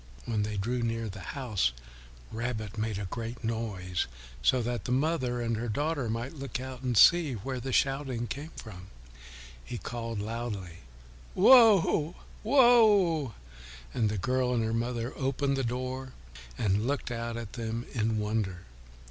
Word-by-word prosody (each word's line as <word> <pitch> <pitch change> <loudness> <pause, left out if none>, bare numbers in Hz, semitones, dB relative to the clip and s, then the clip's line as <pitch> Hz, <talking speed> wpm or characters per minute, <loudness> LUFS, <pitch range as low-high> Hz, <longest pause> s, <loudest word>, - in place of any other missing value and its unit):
When 110 -3 0
they 105 0 -2
drew 120 +5 -1
near 115 -1 -1
the 100 +1 -8 0.2
house, 105 - 0 0.6
Rabbit 110 -3 -3
made 110 -2 -2
a 100 - -3
great 115 +5 -6
noise 105 -6 -2 0.3
so 120 - +3
that 120 +1 -3
the - - -2
mother 130 -3 +1
and 115 -1 0
her 120 +1 -3
daughter 145 +1 -1
might 115 +5 -3
look 135 -4 -5
out 130 -1 -7
to 125 -2 -1
see 160 - +6
where 125 +4 -4
the 130 +2 -4
shouting 135 -3 +1
came 145 +6 -6
from. 95 -3 -10 0.8
He 120 - -6
called 115 -1 -5
loudly, 105 -5 -4 0.6
"Whoa, 195 - +6 0.3
Whoa." 210 - +5 0.6
And 110 -3 +1
the 105 - -2
girl 125 +5 +1
and 115 - +1
her 110 0 -1
mother 120 +1 -2
opened 135 +1 0
the 135 - -1
door 130 +2 -3 0.4
and 105 +1 +1
looked 140 -2 -2
out 115 0 -3
at 115 -3 -7
them 115 0 -4
in 110 -2 0
wonder. 105 -4 -2
120 Hz, 155 wpm, -29 LUFS, 110-135 Hz, 0.8 s, see